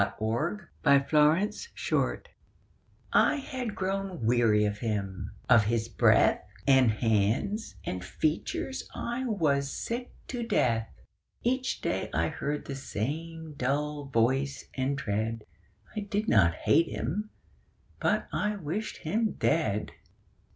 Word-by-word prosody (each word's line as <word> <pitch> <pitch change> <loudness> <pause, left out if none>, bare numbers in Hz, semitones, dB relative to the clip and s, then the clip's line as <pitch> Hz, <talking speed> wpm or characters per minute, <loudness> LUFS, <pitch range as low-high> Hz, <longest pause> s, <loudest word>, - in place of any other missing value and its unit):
THOU 100 - +3 0.8
SHALT 140 0 +4
NOT 170 - +3
KILL - - 0 0.9
I - - +5
had 255 -6 -4
grown 195 - -2
weary 115 -3 +4
of 105 0 -2
him; 100 -4 -3 0.2
of 115 -4 +6
his 115 +1 0
breath - - +4 0.2
And 130 -3 +6
hands 115 - 0
and 90 -1 -3
features 155 - -2
I 240 +2 -3
was 145 - +1
sick 240 - -4 0.2
to 245 -2 -3
death. 115 - +1 0.5
Each 260 +2 0
day - - -1
I - - +2
heard 145 +1 -3
the 140 - -5
same 155 +6 -4
dull 145 +2 -1
voice 135 +2 +1
and 135 +1 -1
tread; 110 -2 -2 0.5
I - - -1
did 205 +1 -2
not 85 -6 +4
hate 165 0 +3
him: 205 - -3 0.7
but - - +1
I 210 0 0
wished 195 +4 -4
him 215 +6 0
dead. 110 -11 0
140 Hz, 125 wpm, -29 LUFS, -, 0.9 s, of